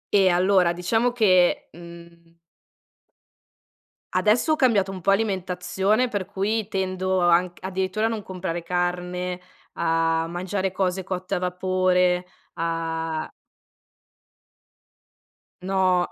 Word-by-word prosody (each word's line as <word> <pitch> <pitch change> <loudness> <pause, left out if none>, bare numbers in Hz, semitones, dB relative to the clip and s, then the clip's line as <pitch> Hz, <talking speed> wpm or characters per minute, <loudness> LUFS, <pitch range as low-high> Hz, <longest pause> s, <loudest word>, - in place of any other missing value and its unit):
Eh, 195 -2 +5
allora 180 0 +3
diciamo 225 +8 +1
che 185 -7 +3
mhmm 170 0 -14 1.8
adesso 235 +9 +3
ho - - +3
cambiato 215 -9 +2
un 190 - -6
po' 195 +3 +2
alimentazione 195 +2 0
per 205 -4 -3
cui 200 +2 -2
tendo 185 -2 -1
anc 175 +1 +2
addirittura 190 +3 -1
a - - -1
non 220 -2 -4
comprare 185 -2 -4
carne, 180 +1 -2 0.3
a 165 0 +1
mangiare 185 +2 -3
cose 190 0 -1
cotte 185 +1 -3
a - - -1
vapore, 180 0 +1 0.3
a 165 -1 -3 2.3
No. 185 -1 +1
185 Hz, 105 wpm, -24 LUFS, 175-195 Hz, 2.3 s, Eh